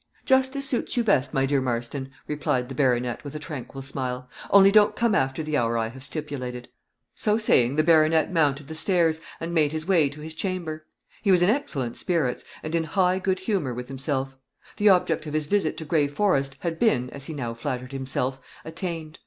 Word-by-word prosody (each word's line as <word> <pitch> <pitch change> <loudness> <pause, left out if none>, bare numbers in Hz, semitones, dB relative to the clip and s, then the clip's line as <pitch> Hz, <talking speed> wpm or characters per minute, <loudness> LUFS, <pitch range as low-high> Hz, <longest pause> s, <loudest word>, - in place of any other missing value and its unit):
"Just 265 +1 +3
as 275 0 -1
suits 255 -1 -1
you 240 - +3
best, 145 - +2
my 135 0 +1
dear 140 0 +1
Marston," 125 +2 -3 0.2
replied 130 -4 -1
the - - -5
baronet, 125 -3 0
with 145 0 -8
a - - -1
tranquil 140 -3 -7
smile; 130 -2 -4 0.2
"only 195 0 +7
don't 210 0 +5
come 235 -2 +2
after 135 +1 0
the 155 0 -2
hour 115 -3 +1
I 115 -1 -1
have 130 +2 -11
stipulated." 135 -5 -5 0.4
So 210 0 +1
saying, 130 - +3
the 155 - +3
baronet 160 +1 +4
mounted 145 -4 +1
the 160 - -7
stairs, 165 -1 +1 0.2
and 165 +1 -4
made 155 -3 +3
his 155 +1 -3
way 165 -7 +4
to 145 +2 -11
his 160 +1 -7
chamber. 160 -3 -4 0.3
He 205 - 0
was 180 -2 +5
in 185 - +5
excellent 140 - -2
spirits, 160 -9 -1 0.2
and 155 - -5
in 165 -1 +1
high 185 +2 +2
good 190 0 -1
humor 185 - -1
with 125 0 -6
himself: 135 0 -2 0.4
the 210 0 +5
object 165 -4 +2
of 150 - -4
his 155 -1 0
visit 195 -2 0
to 160 - -6
Gray 150 -2 +2
Forest 140 -4 0
had 165 -2 -3
been, 125 - +2
as 140 -1 -7
he 160 - -5
now 120 -5 -3
flattered 125 +1 -4
himself, 135 -1 -2 0.2
attained. 165 -1 -5
155 Hz, 205 wpm, -25 LUFS, 135-175 Hz, 0.4 s, only